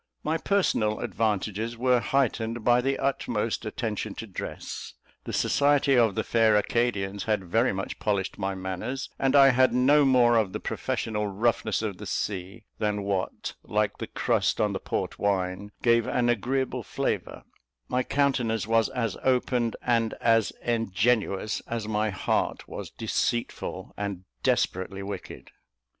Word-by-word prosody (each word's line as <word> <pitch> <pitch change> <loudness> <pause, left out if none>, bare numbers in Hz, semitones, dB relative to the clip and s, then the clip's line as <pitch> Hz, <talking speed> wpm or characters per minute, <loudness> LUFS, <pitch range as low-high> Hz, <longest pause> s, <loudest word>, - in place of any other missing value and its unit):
My 160 +2 0
personal 115 - +1
advantages 110 +1 -1
were 125 0 +3
heightened 120 -3 0
by 120 +1 +4
the 135 +2 0
utmost 115 -5 -1
attention 110 -2 -3
to 115 - -6
dress; 95 -5 -6 0.3
the - - -4
society 140 -1 +3
of 115 -5 +4
the 110 - 0
fair 110 -1 +3
Acadians 100 -3 0
had 105 -3 0
very 115 +8 +2
much 95 0 -4
polished 100 -2 -1
my 95 -1 -1
manners, 95 +8 -4
and 135 0 +2
I 135 -1 +8
had 130 0 +4
no 140 +4 +5
more 125 -3 +5
of 105 -4 +1
the - - -3
professional 105 -2 -2
roughness 110 0 0
of 100 -4 -3
the - - -7
sea 95 +1 -3 0.2
than 105 -1 0
what, 100 -2 -2
like - - -1
the - - -4
crust - - 0
on - - +2
the - - -2
port - - -3
wine, 100 0 -1
gave 115 -1 +4
an 120 -1 +1
agreeable 130 +3 0
flavour; - - -3 0.4
my 125 - +1
countenance 125 -5 +1
was 115 0 +2
as 120 -4 -2
open 125 -2 +1
and 115 -2 +1
as 115 -2 +3
ingenuous 110 -2 0
as 115 -2 -3
my 110 0 0
heart 95 - -1
was - - -7
deceitful 120 0 -2
and 100 -3 -4 0.2
desperately 95 +2 0
wicked. 100 -1 -7
115 Hz, 150 wpm, -27 LUFS, 100-125 Hz, 0.4 s, I